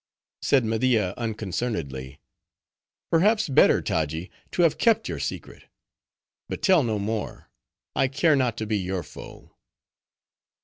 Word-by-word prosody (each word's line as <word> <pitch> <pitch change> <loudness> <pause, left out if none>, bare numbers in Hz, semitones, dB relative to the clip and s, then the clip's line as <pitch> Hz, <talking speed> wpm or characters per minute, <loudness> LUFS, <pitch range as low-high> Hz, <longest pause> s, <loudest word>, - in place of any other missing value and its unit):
Said 135 -4 +3
Media, 110 -4 +1
unconcernedly, 95 - -4 0.9
"Perhaps 205 +6 +3
better, 135 - +4
Taji, 80 +3 -2 0.2
to 175 - +1
have 165 - +2
kept 225 -1 +3
your - - -4
secret; - - -6 0.8
but - - -5
tell 185 -4 +5
no 115 -5 -1
more; 105 +2 -4 0.4
I 135 - +3
care 145 +4 +2
not 125 -5 0
to 110 - -3
be 105 -1 0
your 95 -1 -3
foe." - - -13
110 Hz, 125 wpm, -25 LUFS, 95-140 Hz, 0.9 s, tell